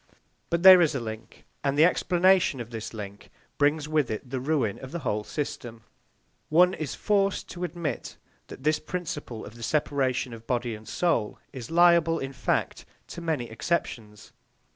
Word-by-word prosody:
But 170 0 0
there 185 -1 +10
is 155 -4 +2
a - - 0
link, 110 -1 -8 0.2
and 140 0 0
the 155 - +7
explanation 180 -4 +3
of 120 0 -7
this 110 -2 -6
link 100 -2 -9 0.3
brings 145 +1 +2
with 155 -4 +1
it 110 +4 -5
the 130 +1 -3
ruin 130 -6 0
of 130 - -9
the 170 - -3
whole 105 -2 -1
system. 120 -4 -5 0.7
One 180 +4 +5
is 155 -6 -4
forced 200 -2 0
to 180 - -6
admit 170 -3 -4 0.3
that 130 - -11
this 155 +1 +2
principle 155 -9 -5
of 105 - -11
the 120 - -13
separation 130 -2 0
of 115 0 -12
body 120 -2 -1
and 110 0 -10
soul 140 -12 0 0.2
is 125 -4 -7
liable, 170 -1 +4
in 135 -2 -5
fact, 130 - -1 0.3
to 170 - -7
many 155 -8 -2
exceptions. 110 -4 -3
145 Hz, 170 wpm, -27 LUFS, 115-170 Hz, 0.7 s, there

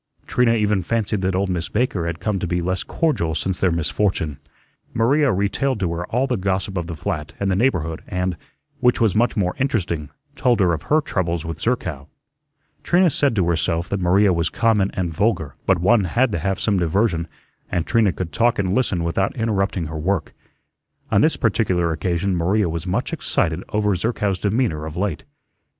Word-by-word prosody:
Trina 120 -2 +2
even 105 -3 +1
fancied 105 +1 -1
that 95 0 0
old 95 +1 0
Miss 85 -2 -2
Baker 105 -7 0
had 85 0 -4
come 105 -3 -1
to 90 - -2
be 90 +1 0
less 90 +1 -1
cordial 85 - 0
since 95 +2 -2
their 90 - +2
misfortune. 85 -2 -1 0.6
Maria 135 +5 +3
retailed 105 +6 0
to 90 -3 0
her 85 +1 -4
all 125 +4 +1
the 125 -3 -1
gossip 95 0 -1
of 85 -2 -2
the 85 - -5
flat 75 -2 -4
and 100 -1 0
the - - +2
neighborhood, 85 - 0
and, 90 0 -1 0.4
which 125 -2 +3
was 110 -5 +3
much 120 +3 +1
more 90 -3 +1
interesting, 90 - -1 0.3
told 125 -4 +2
her 90 -3 +3
of 80 - -3
her 155 +1 +4
troubles 85 - -2
with 80 -1 -6
Zerkow. 85 - -2 0.7
Trina 175 -1 +3
said 140 -3 +1
to 95 -5 +1
herself 85 0 0
that 100 - -1
Maria 95 +2 +4
was 85 -1 0
common 105 -4 +2
and 90 -3 -2
vulgar, 85 - 0
but 95 - +4
one 100 +4 +3
had 120 +7 +1
to 90 - -1
have 95 +3 -1
some 100 -4 +1
diversion, 85 0 +1 0.4
and 85 -2 0
Trina 115 -4 +3
could 90 -2 -5
talk 120 +1 +2
and 95 -2 0
listen 100 -8 +1
without 85 +4 0
interrupting 100 -6 0
her 80 0 -5
work. 95 +1 -1 0.8
On - - +4
this - - +3
particular 85 -2 +1
occasion 90 +3 -1
Maria 95 +4 +1
was 85 +2 -4
much 90 - -1
excited - - -1
over 105 -2 +1
Zerkow's 100 -1 -1
demeanor 100 -8 0
of 80 +1 -7
late. 95 -6 -2
95 Hz, 190 wpm, -21 LUFS, 85-110 Hz, 0.8 s, her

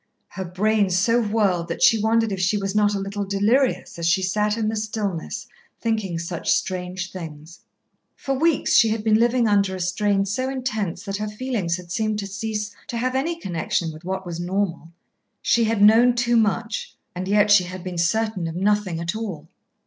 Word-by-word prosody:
Her 190 - -6
brain 205 +3 +1
so 230 +6 +2
whirled 205 -6 +1
that 170 - -3
she 225 -2 +5
wondered 225 0 +2
if 195 - -3
she 185 +3 +2
was 195 -1 -2
not 210 -1 +2
a - - -1
little 200 +1 -3
delirious 205 +3 +1
as 170 - 0
she 185 +2 +2
sat 210 +3 0
in 220 -2 0
the 220 - -1
stillness 215 -1 -3 0.3
thinking 215 -7 -1
such 170 0 -4
strange 185 0 -1
things. 160 -2 -9 0.6
For 275 - -3
weeks 315 +2 +1
she 225 - +6
had 215 0 -2
been 215 0 +3
living 240 0 +3
under 200 -2 +2
a - - -6
strain 195 +2 +1
so 255 +7 -2
intense 220 -10 -3
that 195 -1 -3
her 215 +1 -3
feelings 210 -6 -2
had 175 -1 -11
seemed 215 +2 0
to 205 - -3
cease 210 +1 -4
to 235 - -4
have 255 +2 -1
any 325 +6 -1
connection 170 - -2
with 155 +2 -12
what 190 +1 -4
was 170 -1 -5
normal. 175 -2 -2 0.5
She 235 -1 +2
had 220 -2 +1
known 235 +3 +6
too 240 0 +1
much; 230 - 0 0.2
and 185 +1 -5
yet 205 +1 +3
she 195 -3 +6
had 185 0 -8
been 180 -2 -4
certain 195 +1 0
of 165 - -5
nothing 195 -2 0
at 170 +5 -3
all. 185 -9 -6
205 Hz, 195 wpm, -23 LUFS, 180-220 Hz, 0.6 s, she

